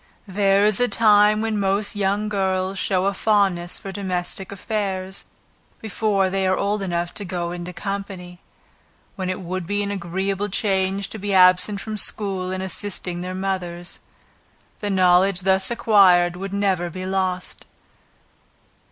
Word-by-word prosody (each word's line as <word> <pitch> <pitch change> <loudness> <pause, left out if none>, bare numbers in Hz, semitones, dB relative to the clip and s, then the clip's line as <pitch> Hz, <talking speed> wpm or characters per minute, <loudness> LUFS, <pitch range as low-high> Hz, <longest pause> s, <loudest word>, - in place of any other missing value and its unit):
There 195 +1 +2
is 210 -2 +3
a 245 - +3
time 210 -2 +4
when 220 -2 -1
most 200 +2 0
young 205 +1 0
girls 190 -1 -1
show 185 -1 0
a 200 - +1
fondness 195 -4 +1
for 195 - -8
domestic 190 -1 -4
affairs 195 -2 -4 0.5
before 210 -3 0
they 190 0 0
are 185 0 +2
old 205 +1 -1
enough 175 -2 -2
to 205 - -5
go 175 -2 -3
into 175 0 -6
company, 190 -2 -6 0.7
when 185 -2 -3
it 185 - -3
would 185 -1 -4
be 205 +1 -1
an 200 - -3
agreeable 195 +2 -2
change 195 -1 0
to 220 - -7
be 200 0 -1
absent 185 +2 +4
from 215 -1 -5
school 195 -3 +1
and 185 0 -3
assisting 185 -2 -4
their 185 +1 -5
mothers; 180 -2 -4 0.8
the 205 - -3
knowledge 185 0 +3
thus 190 +1 +2
acquired 190 -7 +4
would 195 +2 -6
never 195 -3 0
be 185 +2 -6
lost. 185 -1 -2
195 Hz, 150 wpm, -22 LUFS, 185-205 Hz, 0.8 s, time